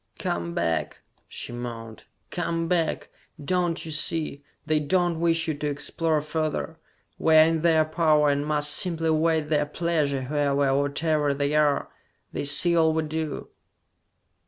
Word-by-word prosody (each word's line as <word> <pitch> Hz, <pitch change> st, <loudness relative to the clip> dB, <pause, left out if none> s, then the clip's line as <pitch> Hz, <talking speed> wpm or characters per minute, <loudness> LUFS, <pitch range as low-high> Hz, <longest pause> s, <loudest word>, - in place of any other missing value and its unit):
"Come 85 Hz, 0 st, -3 dB
back!" 80 Hz, -2 st, -2 dB, 0.3 s
she -, -, -6 dB
moaned. 115 Hz, -2 st, -7 dB, 0.3 s
"Come 165 Hz, -1 st, -2 dB
back! 165 Hz, -2 st, -1 dB, 0.3 s
Don't 175 Hz, +2 st, -1 dB
you 160 Hz, -, -6 dB
see? 155 Hz, -2 st, -2 dB, 0.2 s
They 155 Hz, 0 st, +1 dB
don't 175 Hz, +2 st, 0 dB
wish 165 Hz, -1 st, +1 dB
you 160 Hz, -, 0 dB
to 150 Hz, +1 st, -4 dB
explore 155 Hz, +2 st, -1 dB
further! 155 Hz, +1 st, -3 dB, 0.4 s
We 160 Hz, -1 st, +3 dB
are 155 Hz, -, +9 dB
in 165 Hz, 0 st, +1 dB
their 160 Hz, -2 st, +3 dB
power, 155 Hz, -2 st, +2 dB
and 140 Hz, 0 st, -1 dB
must 150 Hz, 0 st, 0 dB
simply 165 Hz, -2 st, -1 dB
await 160 Hz, -1 st, +1 dB
their 150 Hz, -1 st, +1 dB
pleasure, 150 Hz, -4 st, -1 dB
whoever 140 Hz, 0 st, 0 dB
or 135 Hz, +1 st, +2 dB
whatever 150 Hz, -1 st, 0 dB
they 140 Hz, +1 st, -1 dB
are! 150 Hz, -2 st, +2 dB, 0.4 s
They -, -, -3 dB
see 170 Hz, +4 st, +5 dB
all 160 Hz, -1 st, +3 dB
we 160 Hz, 0 st, 0 dB
do!" 155 Hz, -1 st, -4 dB
155 Hz, 155 wpm, -25 LUFS, 145-165 Hz, 0.4 s, are